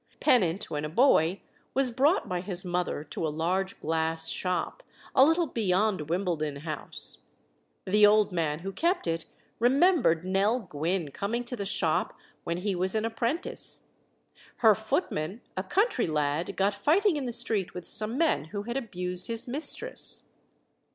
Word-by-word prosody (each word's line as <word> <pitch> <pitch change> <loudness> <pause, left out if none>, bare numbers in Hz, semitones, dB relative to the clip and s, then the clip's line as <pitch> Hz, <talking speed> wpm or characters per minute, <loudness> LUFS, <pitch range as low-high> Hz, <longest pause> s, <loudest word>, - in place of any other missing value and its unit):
Pennant, 190 -6 +2
when 150 -1 -2
a 150 - -3
boy, 185 - +3 0.3
was 265 -2 +2
brought 280 - +2
by 180 -2 -2
his 185 0 -1
mother 175 -4 -2
to 160 +1 -4
a - - -1
large 180 +5 -2
glass 160 +1 -1
shop, 180 - -2 0.3
a 265 - +7
little 325 +4 +3
beyond 200 - 0
Wimbledon 165 -5 -1
House; 155 -1 +1 0.7
the 210 +3 +3
old 210 0 +4
man 160 -3 -1
who 195 +2 -5
kept 340 - 0
it 165 -1 -2 0.3
remembered 255 - +3
Nell 195 +6 +1
Gwynne 165 - -3
coming 225 - -3
to 245 +1 -5
the 200 -4 -4
shop 165 -5 0 0.3
when 170 - -2
he 195 +2 -2
was 185 +3 +1
an 220 0 0
apprentice; 235 +8 -3 0.8
her 220 - +9
footman, 220 - -2
a 185 - -1
country 375 - +1
lad, 150 +1 -1
got 195 +1 +2
fighting 325 - +2
in 280 -4 -3
the - - -2
street 225 -5 +1
with 180 -2 -7
some 215 +4 -1
men 320 - +1
who 200 +5 -5
had 240 +4 -3
abused 180 -7 -3
his 230 +1 -2
mistress. 320 - +1
195 Hz, 160 wpm, -28 LUFS, 170-240 Hz, 0.8 s, her